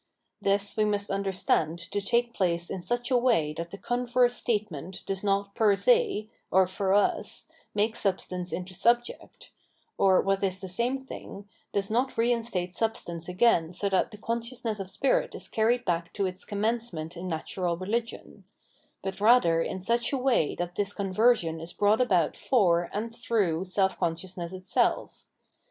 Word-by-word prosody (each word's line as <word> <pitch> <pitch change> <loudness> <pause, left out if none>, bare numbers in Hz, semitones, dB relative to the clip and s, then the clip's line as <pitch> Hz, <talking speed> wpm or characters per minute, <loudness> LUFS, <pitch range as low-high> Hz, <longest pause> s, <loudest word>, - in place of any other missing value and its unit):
This 200 0 +1
we 215 - +2
must 205 -1 0
understand 190 -4 0
to 175 +4 -4
take 235 +3 +1
place 170 -3 0
in 190 - -4
such 240 +7 -2
a 250 - +5
way 225 -12 +2
that 170 +2 -5
the 200 - -8
converse 245 +1 +1
statement 195 - -3
does 195 0 -3
not 200 0 0
per 210 -2 +4
se, 460 - +2 0.2
or 190 0 +5
for 190 +1 0
us, 205 - 0 0.3
make 215 +2 +1
substance 185 -2 -2
into 185 +1 -5
subject, 235 +6 -1 0.5
or, 190 -1 +5
what 195 0 +1
is 190 -1 0
the 190 - -6
same 245 +8 -1
thing, 200 -5 -9 0.2
does 200 +1 -1
not 250 +3 0
reinstate 230 -6 0
substance 175 -7 -3
again 180 -3 +3
so 200 +3 -1
that 190 -1 +2
the 210 - -11
consciousness 230 0 -3
of 190 -1 -5
spirit 270 +7 +1
is - - -8
carried 240 +3 +1
back 170 -1 -1
to 200 - -1
its 185 0 -4
commencement 205 -6 -2
in 175 +2 -6
natural 170 +1 -2
religion; 225 +6 -4 0.6
but 190 +1 -5
rather 210 -8 +5
in 190 - -3
such 235 +5 +1
a 275 - 0
way 255 - +2
that 175 0 -4
this 205 +1 -1
conversion 195 -4 +2
is 165 +2 -7
brought 210 +3 +3
about 180 -10 +2
for 175 -8 +2
and 220 +3 -3
thtongh 195 -7 0
seh 190 +1 +2
consciousness 170 +1 -3
itself. 185 0 -1
200 Hz, 165 wpm, -28 LUFS, 180-230 Hz, 0.6 s, a